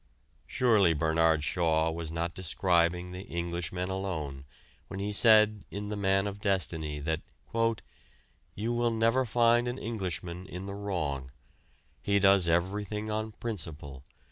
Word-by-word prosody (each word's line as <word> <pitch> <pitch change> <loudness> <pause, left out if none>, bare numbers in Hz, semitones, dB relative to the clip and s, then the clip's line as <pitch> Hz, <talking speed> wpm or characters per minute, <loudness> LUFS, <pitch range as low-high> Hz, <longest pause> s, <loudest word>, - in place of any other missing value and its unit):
Surely 105 -9 +3
Bernard 80 0 +2
Shaw 80 +3 +1
was 80 -1 -5
not 85 +1 -2
describing 90 0 +1
the 90 +1 -6
Englishman 85 +2 -3
alone 80 -8 -4 0.4
when 95 - -7
he 105 +1 -2
said 110 -1 +5
in 105 +1 -5
"The 105 - -3
Man 95 -1 +2
of 100 0 -5
Destiny" 80 -6 -1
that 80 +2 -1 0.7
"... - - -34
you 115 +4 -2
will 120 0 +1
never 115 +3 +2
find 120 +1 +3
an 120 +1 -3
Englishman 90 -6 -4
in 90 +1 -7
the 100 - -5
wrong. 80 -10 -3 0.7
He 100 0 +1
does 95 -2 +5
everything 105 +5 -1
on 110 0 -3
principle. 75 - -6
95 Hz, 140 wpm, -29 LUFS, 80-105 Hz, 0.7 s, said